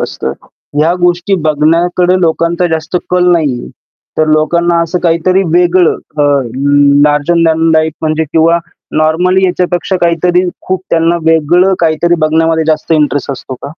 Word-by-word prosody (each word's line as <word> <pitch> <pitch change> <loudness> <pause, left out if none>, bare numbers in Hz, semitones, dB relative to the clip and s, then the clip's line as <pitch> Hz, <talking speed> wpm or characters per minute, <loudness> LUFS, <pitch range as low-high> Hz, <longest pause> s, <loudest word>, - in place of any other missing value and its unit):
असतं. - - -4 0.5
ह्या 160 +3 +2
गोष्टी 175 +2 +1
बघण्याकडे 170 +4 +1
लोकांचा 170 +1 0
जास्त 160 +2 -4
कल 180 0 +2
नाहीये. 145 -8 -1 0.5
तर 155 - +2
लोकांना 170 +3 +1
असं 170 +2 -2
काहीतरी 175 +3 +1
वेगळं 175 0 +3 0.2
अ, - - +3 0.8
लार्जर 150 +3 +1
दॅन 165 0 +1
लाईफ 160 0 +1
म्हणजे 155 0 -1
किंवा 165 +1 +3 0.4
नॉर्मली 175 +5 +1
याच्यापेक्षा 180 +1 -1
काहीतरी 175 +1 +1 0.3
खूप 185 0 -2
त्यांना 165 +1 +1
वेगळं 165 +4 +2
काहीतरी 170 +1 +1
बघण्यामध्ये 160 +1 +1
जास्त 155 +1 -1
इंटरेस्ट 145 -2 0
असतो 130 0 -8
का? - - -10
165 Hz, 135 wpm, -11 LUFS, 155-175 Hz, 0.8 s, वेगळं